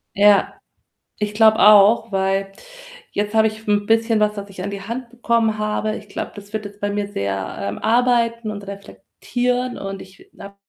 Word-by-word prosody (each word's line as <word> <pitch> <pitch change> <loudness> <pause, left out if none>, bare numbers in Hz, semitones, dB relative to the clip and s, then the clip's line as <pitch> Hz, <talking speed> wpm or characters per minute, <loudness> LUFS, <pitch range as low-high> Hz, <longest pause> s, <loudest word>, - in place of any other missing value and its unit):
Ja, 205 0 +4 0.6
ich 210 0 -3
glaube 220 0 +5
auch, 215 +2 +6
weil 195 0 0 0.6
jetzt 205 +1 -2
habe 220 0 +4
ich 215 0 -8
‘n 205 0 +1
bisschen 225 0 +2
was, 210 0 +1
was 200 -1 -7
ich 185 -1 -9
an 200 - -3
die 200 -1 -6
Hand 235 +4 -6
bekommen 230 -2 0
habe. 215 0 -2
Ich 205 -1 -11
glaube, - - -5
das 205 0 -12
wird 215 -1 -4
jetzt 205 0 -11
bei 205 - -1
mir 205 0 -2
sehr, 95 - -3
ähm, 100 +1 -4
arbeiten 235 -1 +1
und 200 -1 -8
reflektieren, 245 +5 -4
und 195 0 -6
ich 190 +1 -15
äh, - - -18
habe 200 0 -10
210 Hz, 190 wpm, -20 LUFS, 200-225 Hz, 0.6 s, auch